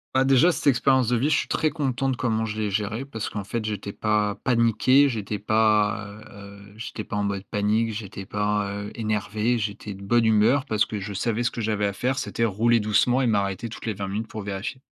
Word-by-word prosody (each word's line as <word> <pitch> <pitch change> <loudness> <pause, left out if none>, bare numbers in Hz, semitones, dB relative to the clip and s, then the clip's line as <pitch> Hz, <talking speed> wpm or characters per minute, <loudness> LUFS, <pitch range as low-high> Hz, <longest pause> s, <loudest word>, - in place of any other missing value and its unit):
Bah 130 - +5
déjà 135 +6 +5
cette 165 - -3
expérience 130 -2 +3
de 125 - +2
vie, 135 +6 +1
je 155 - +3
suis - - -1
très 155 - +1
content 135 -4 -1
de 130 - 0
comment 110 -2 0
je 105 -1 -5
l'ai 105 -1 -1
gérée 110 +5 -2
parce 115 -6 -5
qu'en 105 - -5
fait 110 +4 -3
j'étais 105 -1 -4
pas 105 -1 0
paniqué, 125 +4 +4
j'étais 105 -3 -3
pas, 105 0 +2
heu 100 -1 -13
heu, - - -18
j'étais 110 -1 -6
pas 105 - -5
en 105 - 0
mode 100 -1 -2
panique, 105 +2 0
j'étais 100 -2 -7
pas, 105 0 -1
heu, 100 +1 -5
énervé, 110 +2 0
j'étais 105 -1 -4
de 95 - -12
bonne 115 +4 +2
humeur 110 +5 +3
parce 110 -6 +1
que 105 - -5
je 100 +1 -6
savais 115 +4 -1
ce 120 - 0
que 120 - -5
j'avais 105 -1 0
à 100 - -1
faire, 130 +7 -1
c'était 115 - -1
rouler 115 +3 +2
doucement 110 +5 +2
et 130 - +2
m'arrêter 100 0 0
toutes 110 - -9
les 110 - -1
20 100 0 -5
minutes 105 +4 -3
pour 110 - -6
vérifier 100 +6 -5
110 Hz, 235 wpm, -24 LUFS, 105-120 Hz, -, Bah